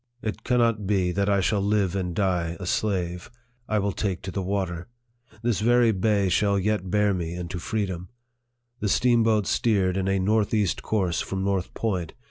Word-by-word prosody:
It 110 - -4
cannot 115 -4 +1
be 95 -3 +1
that 100 +2 0
I 100 -1 +3
shall 100 +2 +1
live 100 -2 +1
and 90 -3 -2
die 90 -4 0
a 90 - -6
slave. 90 -3 -1 0.4
I 110 - +1
will 100 0 +1
take 95 -3 -3
to 95 - -5
the 100 - -3
water. 90 -2 -2 0.6
This 120 -4 +1
very 120 +1 +4
bay 100 0 +1
shall 100 +2 +2
yet 100 -1 -1
bear 105 +1 +2
me 85 -2 -3
into 90 0 -5
freedom. 95 -3 -3 0.7
The 105 - -1
steamboats 115 -2 +3
steered 95 -5 +1
in 95 0 -1
a 95 0 +2
north 105 +3 +1
east 100 -5 0
course 95 -6 0
from 95 0 -3
North 95 -2 -1
Point. 90 -8 -2
100 Hz, 180 wpm, -25 LUFS, 90-105 Hz, 0.7 s, very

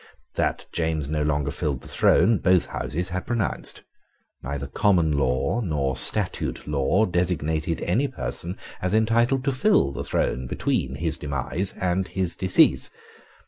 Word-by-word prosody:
That - - -1
James 80 -4 -2
no 75 0 -1
longer 75 -1 0
filled 70 -6 -2
the - - -12
throne 105 +4 +3
both 90 -1 +3
Houses 90 +4 -4
had 95 0 -4
pronounced. 115 -4 -2 0.6
Neither 70 +1 -4
common 85 +2 +2
law 70 - 0
nor 70 - -1
statute - - +3
law 75 +9 +2
designated 80 -3 -1
any 120 +11 +1
person 95 -8 -4 0.2
as 90 +3 0
entitled 115 +4 +2
to 140 - +1
fill 130 - +2
the 70 - -5
throne 65 +1 -1
between 65 +1 -1
his 80 +2 -2
demise 70 +7 -1
and 90 +1 0
his 95 -3 -1
decease. 95 -1 +3
85 Hz, 145 wpm, -24 LUFS, 70-95 Hz, 0.6 s, throne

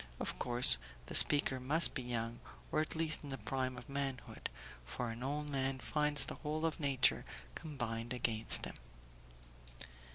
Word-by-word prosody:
Of - - -6
course 120 - +8 0.3
the - - -11
speaker 145 -3 +6
must 150 +6 +2
be - - -6
young, 120 -1 -6 0.3
or - - -1
at 155 - -7
least 160 -1 -2
in 145 - -10
the 135 - -7
prime 130 -2 -6
of 125 - -13
manhood; 140 -2 -7 0.3
for 115 - -7
an 115 +2 -11
old 145 +3 -5
man 135 -1 -3
finds 150 +3 -1
the - - -8
whole 155 +1 -5
of 165 0 -4
nature 140 -4 0 0.3
combined 120 - -8
against 115 -3 +2
him. - - -9
130 Hz, 160 wpm, -32 LUFS, 120-150 Hz, 0.3 s, course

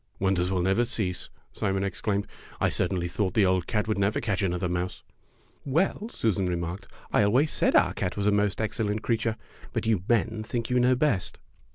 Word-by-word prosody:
"Wonders 95 -2 +1
will 95 -2 0
never 95 +6 +3
cease!" 105 -7 -2 0.2
Simon 95 -1 -1
ex 100 -2 -3
claimed. 100 -2 0 0.3
"I - - +2
certainly 90 -1 0
thought 95 +1 -1
the 105 - +5
old 95 -1 +1
cat 105 -1 0
would 110 -2 0
never 100 +2 +1
catch 100 -4 -1
another 90 -1 0
mouse." 90 +1 -3 0.6
"Well," 180 - 0
Susan 100 - 0
remarked, 85 +1 -3 0.3
"I - - +5
always 125 +10 +3
said - - +2
our - - +4
cat 90 - -3
was 100 - -1
a 105 - +4
most 100 -2 +1
excellent 110 -1 -1
creature, 115 -1 0 0.4
but - - -2
you 110 -5 +2
men 115 -1 +1
think 115 +2 -3
you 125 - +3
know 125 +1 +4
best." 125 - 0
100 Hz, 195 wpm, -27 LUFS, 95-115 Hz, 0.6 s, the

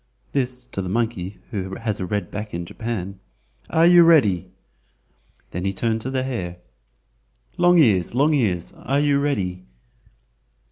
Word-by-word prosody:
(this 125 -2 -1
to 125 -5 -5
the 90 - -4
monkey, 105 -3 -2
who 95 -3 -4
has 110 -3 -3
a 95 - -3
red 100 -2 -3
back 105 -2 -5
in 85 0 -4
Japan). 100 -2 -5 0.5
"Are 165 +1 +4
you 175 0 +8
ready?" 135 - +4 1.0
Then 90 - -4
he 95 0 -1
turned 110 +3 -1
to 130 - -4
the 130 -1 -1
hare: 95 -10 -4 1.0
"Long 175 0 +4
ears! 110 - +3
Long 145 +4 +3
ears! 95 - 0
are 135 +3 -1
you 145 -1 +2
ready?" 95 -11 -1
115 Hz, 150 wpm, -22 LUFS, 95-135 Hz, 1.0 s, you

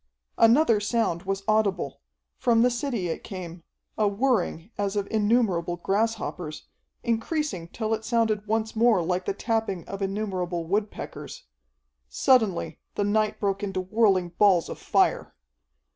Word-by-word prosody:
Another 230 -1 +5
sound 205 -5 -1
was 195 0 -2
audible. 200 -9 +1 0.3
From 230 -1 +3
the 250 - +4
city 240 -6 -2
it 160 - -4
came, 180 -3 -7 0.4
a 210 - +4
whirring 210 -4 0
as 200 0 -2
of 200 -1 -1
innumerable 205 -6 +2
grasshoppers, 195 -5 -2 0.4
increasing 235 - -1
till 220 +4 -2
it 220 0 -2
sounded 220 -3 0
once 220 +1 -1
more 225 -5 +4
like 180 +2 -1
the - - 0
tapping 220 -6 -2
of 195 0 -6
innumerable 190 -4 -2
woodpeckers. 205 +5 -4 0.7
Suddenly 220 - +2 0.2
the 205 - 0
night 215 +1 +1
broke 195 -1 -1
into 195 -2 -2
whirling 190 -2 +2
balls 180 -1 +3
of - - -7
fire. - - +1
205 Hz, 135 wpm, -26 LUFS, 185-225 Hz, 0.7 s, Another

